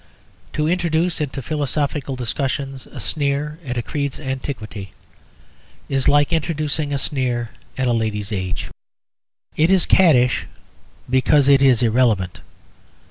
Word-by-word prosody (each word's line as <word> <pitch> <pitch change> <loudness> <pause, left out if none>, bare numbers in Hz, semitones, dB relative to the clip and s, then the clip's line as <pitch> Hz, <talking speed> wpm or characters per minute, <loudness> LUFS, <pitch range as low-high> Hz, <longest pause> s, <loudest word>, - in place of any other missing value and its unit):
To 150 0 0
introduce 170 -1 +1
into 140 -2 -3
philosophical 145 -1 -1
discussions 135 +2 -3
a - - -10
sneer 150 +1 -1
at 125 -3 -4
a 120 - -1
creed's 140 -1 -3
antiquity 130 -8 -5 1.0
is 135 -1 0
like 145 +2 +4
introducing 155 -2 -1
a 140 - 0
sneer 125 -4 -1 0.3
at 130 -1 0
a 120 - +2
lady's 110 -2 -2
age. 95 -3 -3 0.8
It 160 +2 +3
is 190 -3 +4
caddish 130 -10 +4 0.6
because 130 +2 +3
it 140 -1 +6
is 125 -3 +5
irrelevant. 110 -6 +1
135 Hz, 125 wpm, -21 LUFS, 125-150 Hz, 1.0 s, it